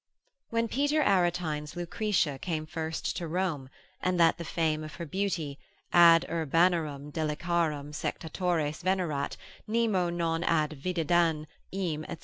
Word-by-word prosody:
When 230 0 0
Peter 290 +5 +1
Aretine's 175 - +1
Lucretia 175 -5 0
came 160 -2 -3
first 160 0 -3
to 170 - -3
Rome, 160 -6 -2 0.3
and 180 -1 0
that 165 0 +4
the - - -3
fame 155 -2 0
of 155 - -8
her 170 - -5
beauty, 165 -5 -2 0.3
ad 170 -1 +7
urbanarum 160 -3 +1
deliciarum 155 -1 -1
sectatores 160 -1 -2
venerat, 180 -6 -1 0.3
nemo 215 -5 +1
non 170 -1 -1
ad 155 -3 +2
videndam 170 -2 +1 0.3
eam, 170 -5 -2
&c. - - -5
170 Hz, 130 wpm, -29 LUFS, 155-180 Hz, 0.3 s, ad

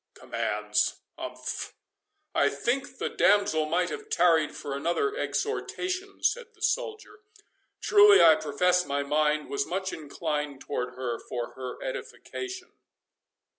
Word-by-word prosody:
"Commands—umph—I - - -3
think 265 +2 -2
the - - -2
damsel 200 -7 +3
might 175 +2 +1
have 150 - -7
tarried 165 -3 +3
for 140 - -5
another 175 - 0
exhortation," 385 -3 -3
said 470 -2 0
the 420 - -26
soldier—"truly, 425 -2 +2
I 165 -1 +9
profess 180 +4 +2
my 140 -3 -1
mind 150 +1 +1
was 140 0 -1
much 190 +3 -2
inclined 150 -2 -3
toward 125 -3 -4
her 125 -2 -3
for 120 -1 -5
her 130 -1 -7
edification." 385 -6 -6
175 Hz, 110 wpm, -28 LUFS, -, -, I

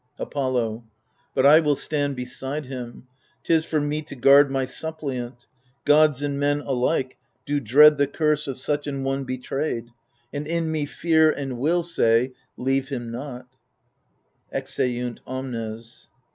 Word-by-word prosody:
Apollo 125 -5 -2 0.5
But 130 - +3
I 150 +3 +8
will 150 -3 +2
stand 145 -1 -2
beside 130 +4 -4
him; 125 -2 -8 0.4
'tis 160 -1 +2
for 155 - 0
me 145 +1 -1
To 145 - -10
guard 140 +2 +6
my 135 -1 0
suppliant: 130 -6 -5 0.4
gods 150 -2 +4
and 140 -1 -2
men 145 0 +1
alike 130 0 -1 0.3
Do 145 0 0
dread 145 +5 +6
the 145 - +3
curse 150 +1 0
of 135 - -4
such 145 +2 -2
an 140 -2 -3
one 135 0 -1
betrayed. 130 -1 -3 0.4
And 145 +1 -4
in 165 -1 -1
me 155 -2 -1
Fear 160 0 +3
and 135 -5 -3
Will 170 +6 +2
say 125 -7 +2 0.3
Leave 135 +1 0
him 120 -4 -4
not, 125 0 -7 1.0
[Exeunt 125 -1 -2
omnes. 115 -3 -6
140 Hz, 145 wpm, -24 LUFS, 125-150 Hz, 1.0 s, I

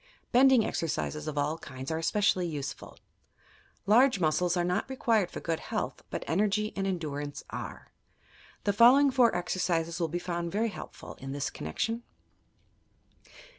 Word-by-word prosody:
Bending 255 -2 +6
exercises 155 -1 -2
of 150 -1 -4
all 150 +3 0
kinds 130 +1 -7
are 160 - -1
especially 185 +1 +2
useful. 145 -4 -6 0.9
Large 235 +2 +5
muscles 175 +2 +1
are 175 - +2
not 180 +8 -1
required 225 -7 +1
for - - -6
good 165 -1 -2
health, - - -4
but - - -4
energy 210 +5 +1
and 195 0 -1
endurance 145 -6 -4
are. - - -7 0.7
The 205 - +1
following 260 +6 +7
four 245 -6 +4
exercises 175 -2 -1
will 165 - +1
be 165 +2 -3
found 175 -1 -3
very 225 +4 0
helpful, - - -9
in 135 +1 -6
this 140 -1 -2
connection. 225 - -3
175 Hz, 145 wpm, -29 LUFS, 160-215 Hz, 0.9 s, following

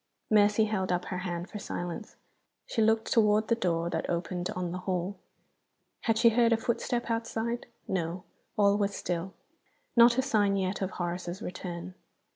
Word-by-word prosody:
Mercy 210 +1 +5
held 190 -4 -1
up 180 0 0
her 180 - -3
hand 175 -1 -3
for 210 - -7
silence. 175 +1 -5 0.5
She 225 - -1
looked 220 0 +2
toward 215 -1 +4
the 230 - +4
door 170 -6 0
that - - -2
opened 175 +1 -2
on 180 -1 -2
the 180 - -4
hall; 185 +1 -2 0.9
had 225 -1 +3
she 235 +1 +6
heard 235 +1 +3
a 230 - +5
footstep 235 +1 -1
outside? 230 +1 -2 0.2
No. 175 -1 -2 0.3
All 200 0 +4
was 200 -1 0
still. 175 +2 -3 0.6
Not 235 +1 +7
a 260 - +3
sign 205 -5 +2
yet 190 +1 -1
of 190 - 0
Horace's 175 0 -4
return. 180 0 -6
200 Hz, 165 wpm, -29 LUFS, 180-225 Hz, 0.9 s, Not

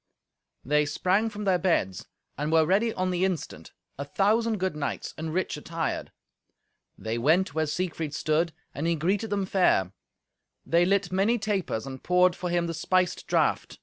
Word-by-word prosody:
They 150 +2 +2
sprang 190 +8 +1
from 210 -1 -7
their 190 -3 +2
beds 125 - 0 0.3
and 150 +3 -2
were 160 -1 +5
ready 205 +7 +2
on 185 -3 -1
the 180 0 0
instant, 165 - -3 0.3
a - - -1
thousand 215 +8 +1
good 185 -3 -1
knights 145 -3 -4
and 160 0 -5
rich 180 -2 -1
attired. 165 +1 -3 0.9
They 110 +1 -3
went 160 +7 +2
where 155 0 0
Siegfried 160 -2 -3
stood, 160 +2 +1 0.2
and 150 +4 -2
he 170 - +2
greeted 190 +7 0
them 200 -1 0
fair. 180 - +2 0.7
They 170 +1 +3
lit 195 -1 +1
many 200 +6 +2
tapers, 200 - -2
and 130 -1 -7
poured 180 0 +3
for 180 -1 -4
him 175 0 +1
the 165 - -3
spiced 180 +2 0
draught. - - 0
175 Hz, 170 wpm, -27 LUFS, 155-190 Hz, 0.9 s, were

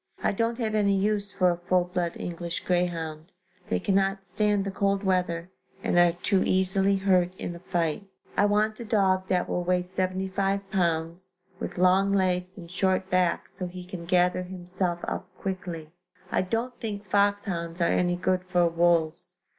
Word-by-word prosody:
I - - +3
don't 230 +3 0
have 225 -3 -1
any 200 -2 +3
use 205 +1 0
for 185 -3 +3
a 175 - -2
full 180 +1 +2
blood 175 -1 -2
English 170 0 -4
greyhound 170 -2 -2 0.4
they 90 - +1
cannot 195 - +1
stand 205 +2 +1
the 195 - -2
cold 200 +1 0
weather 180 -2 0 0.3
and 175 - +3
are 175 -1 +5
too 185 +2 +1
easily 190 +1 +2
hurt 185 -2 +2
in 175 - -4
a - - -9
fight. 175 +1 -2 0.3
I 205 - +4
want 210 +1 +1
a - - -4
dog 190 -4 +2
that 180 -1 +1
will 180 - -1
weigh 180 0 +1
75 190 +2 -1
pounds, 170 0 -1 0.3
with - - -5
long 190 +2 +4
legs 185 -1 0
and 170 -2 -10
short 185 0 0
back 180 -2 +2
so 180 - -6
he 180 0 -8
can 180 -2 -7
gather 180 +1 +3
himself 180 -1 -3
up - - -3
quickly. 175 -5 -5 0.4
I - - +2
don't 230 +6 -2
think 210 -2 -5
foxhounds 195 -4 0
are - - +2
any 175 +1 +2
good 185 +1 0
for 180 -1 +3
wolves. 170 0 +1
185 Hz, 170 wpm, -27 LUFS, 175-195 Hz, 0.4 s, are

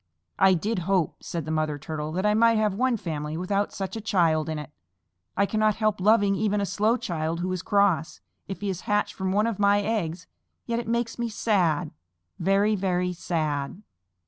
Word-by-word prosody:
"I 190 -1 +6
did 205 +4 -1
hope," 185 -5 +1
said 165 -4 -4
the 155 - -4
Mother 155 -2 0
Turtle, 150 +1 -5
"that 185 +3 -1
I 210 - +4
might 230 +1 +4
have 215 -2 +1
one 250 +3 +1
family 155 -4 -4
without 200 +3 -1
such 195 +1 -5
a 225 - -4
child 165 -7 +1
in 155 - -2
it. 150 -1 -7 0.7
I 200 - +4
cannot 215 0 +1
help 215 -3 0
loving 205 0 +4
even 210 +1 0
a 200 - 0
slow 210 +5 +1
child 165 -4 -3
who 185 +1 -2
is 185 -2 -2
cross, 200 -5 +1 0.3
if 195 +1 -6
he 205 - -2
is 185 - -6
hatched 210 0 +1
from 190 -1 -2
one 210 +3 +2
of 230 -4 -2
my 200 0 +4
eggs, 185 -6 -2 0.4
yet 235 -1 -1
it 235 - -6
makes 235 0 -1
me 235 -1 -1
sad 180 -8 +1 0.5
very, 200 +4 +2
very 180 -2 0
sad." 155 0 -3
195 Hz, 200 wpm, -26 LUFS, 165-210 Hz, 0.7 s, I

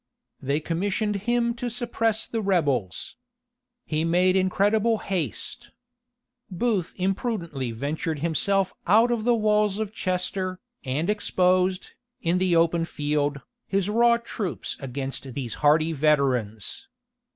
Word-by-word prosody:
They 140 +3 0
commissioned 200 +6 -1
him 240 -1 +2
to 240 +1 -4
suppress 225 -2 0
the 225 - -3
rebels. 140 - 0 0.7
He 155 +1 -1
made 180 +3 +3
incredible 205 +4 +2
haste. 175 - -3 0.8
Booth 195 -1 -1
imprudently 185 - -2
ventured 145 +7 -3
himself 185 +5 +1
out 225 +6 +5
of 230 -2 -1
the 240 -1 +4
walls 210 -2 +2
of 215 -1 -3
Chester, 185 -1 -2 0.2
and 140 +5 -1
exposed, 185 -2 +1 0.3
in 170 +2 +1
the 185 -2 +2
open 165 0 +3
field, 145 -2 -1 0.3
his 195 0 0
raw 235 +1 +4
troops 220 -6 -4
against 135 -1 -5
these 125 -5 -4
hardy 155 +2 +4
veterans. 130 -8 0
185 Hz, 120 wpm, -25 LUFS, 150-210 Hz, 0.8 s, out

